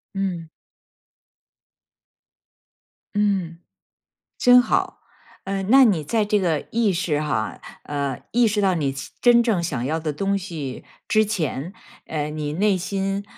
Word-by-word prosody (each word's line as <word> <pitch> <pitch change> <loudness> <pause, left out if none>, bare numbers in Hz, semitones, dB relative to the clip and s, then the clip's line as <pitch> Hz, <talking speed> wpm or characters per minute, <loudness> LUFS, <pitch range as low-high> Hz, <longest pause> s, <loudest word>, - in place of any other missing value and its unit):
嗯。 180 -4 -3 2.7
嗯， 195 -5 0 0.8
真 250 0 +7
好。 245 - -1 0.4
呃， 195 0 -2
那 265 +6 +6
你 185 -9 +2
在 215 +8 0
这 210 0 +1
个 165 -5 0
意 225 -4 +2
识 165 -4 -1
哈， 150 -3 -2 0.2
呃， 140 -3 -3
意 240 -1 +4
识 210 0 0
到 190 -2 +2
你 140 -5 -1 0.3
真 240 -1 +6
正 210 -8 +1
想 130 -7 -2
要 160 +3 -1
的 155 -1 -2
东 195 +6 -1
西 160 -9 -6 0.2
之 215 0 +3
前， 170 -6 -3 0.3
呃， 150 -1 -3
你 150 -1 -4
内 200 +1 +2
心， 195 +2 -2
185 Hz, 140 characters per minute, -23 LUFS, 155-205 Hz, 2.7 s, 真